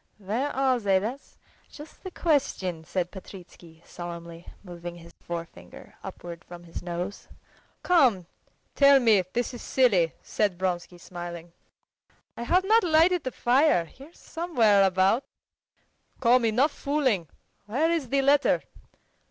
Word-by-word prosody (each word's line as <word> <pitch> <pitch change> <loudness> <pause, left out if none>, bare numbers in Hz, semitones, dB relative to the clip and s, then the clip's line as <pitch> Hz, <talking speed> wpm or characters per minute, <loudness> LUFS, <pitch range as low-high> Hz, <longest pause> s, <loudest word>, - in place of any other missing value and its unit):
"Where 215 +8 -2
are 260 -2 +2
they? 200 -3 +2
That's 230 +8 -5 0.3
just 300 +1 -13
the 375 - -5
question!" 265 - -1
said 180 +1 -2
Petritsky 175 -4 -13
solemnly, 170 -1 -9 0.2
moving 175 -2 -8
his 170 0 -14
forefinger 165 - -9
upwards 170 -1 -8
from 175 0 -11
his 170 - -8
nose. 175 +3 -5 0.6
"Come, 260 - +3 0.5
tell 280 -1 +6
me; 225 -6 +4
this 245 +2 -2
is 245 - -8
silly!" 195 -11 +2
said 200 -4 -1
Vronsky 180 -1 -3
smiling. 175 -1 -8 0.8
"I - - -8
have 355 +10 +2
not 440 +3 +4
lighted 340 +1 +3
the 255 - -2
fire. 250 - +2
Here 275 - -15
somewhere 245 - +1
about." 190 +6 +2 1.0
"Come, 245 -1 +4
enough 250 +7 +2
fooling! 265 - -1 0.4
Where 295 +10 +1
is 315 -7 -1
the 275 +1 +1
letter?" 280 +1 +3
215 Hz, 130 wpm, -26 LUFS, 175-275 Hz, 1.0 s, tell